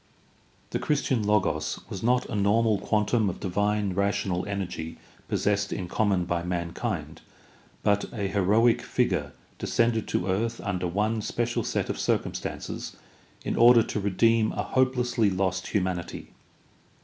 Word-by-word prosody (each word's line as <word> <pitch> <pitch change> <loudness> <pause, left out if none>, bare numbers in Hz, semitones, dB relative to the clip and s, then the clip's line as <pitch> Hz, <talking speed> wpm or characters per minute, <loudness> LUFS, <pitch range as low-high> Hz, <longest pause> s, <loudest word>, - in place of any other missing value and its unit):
The - - -1
Christian 140 -5 0
Logos 105 -1 +1
was 95 - -6
not 125 +2 +2
a - - -7
normal 105 +1 +2
quantum 105 0 +1
of 90 - -6
divine 105 +1 0
rational 100 -1 0
energy 90 -5 -4 0.3
possessed 100 0 0
in 90 - -3
common 95 -2 +1
by 85 0 -1
mankind, 85 -1 -3 0.6
but 105 0 +2
a 100 -4 -2
heroic 105 +4 +3
figure - - 0 0.3
descended 115 -2 +1
to 90 - -1
earth 110 +5 -1
under 90 -3 -1
one 105 +5 0
special 120 +3 -1
set - - -1
of - - -3
cir - - +3
cumstances - - -6 0.5
in - - -1
order 120 -1 +7
to 105 - -3
redeem 110 +3 +2
a - - -2
hopelessly 125 -4 +2
lost 95 -1 -1
humanity. 90 -3 -2
105 Hz, 135 wpm, -27 LUFS, 95-115 Hz, 0.6 s, order